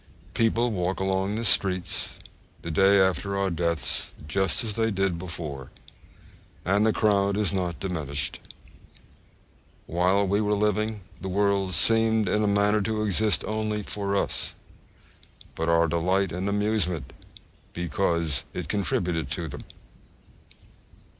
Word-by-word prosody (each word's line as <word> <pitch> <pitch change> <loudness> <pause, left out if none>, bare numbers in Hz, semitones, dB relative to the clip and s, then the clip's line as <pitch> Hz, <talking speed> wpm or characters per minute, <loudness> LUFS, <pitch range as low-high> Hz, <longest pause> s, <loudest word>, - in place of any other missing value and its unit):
_ - - -26
People 115 +1 +2
walk 90 -2 -1
along 95 +1 0
the 115 +1 -2
streets 95 -2 +2 0.5
the 85 - -4
day 95 +4 +5
after 95 +1 +1
our 100 -1 0
deaths 85 -3 -1
just 95 +7 +1
as 110 -2 -3
they 115 +1 +1
did 95 -4 0
before, 80 -7 -6 1.0
and 100 +3 +3
the - - +4
crowd 100 -2 +2
is 105 -3 +1
not 90 -5 -2
diminished. 75 -7 -2 1.5
While 90 +4 +2
we 100 +3 +2
were 105 0 +1
living, 105 +1 0 0.2
the 95 - -4
world 100 -1 +1
seemed 110 0 +3
in 105 +4 +1
a - - +2
manner 100 +1 +3
to 110 +1 -1
exist 105 +1 +1
only 110 -1 -2
for 100 0 -2
us, - - -1 1.0
for 80 +1 -2
our 85 0 +4
delight 90 +3 +1
and 90 +3 -2
amusement, 100 - -1 0.6
because 85 -2 0
it - - -4
contributed 90 -6 -1
to 85 -1 -3
them. 75 - -7
95 Hz, 135 wpm, -26 LUFS, 85-105 Hz, 1.5 s, day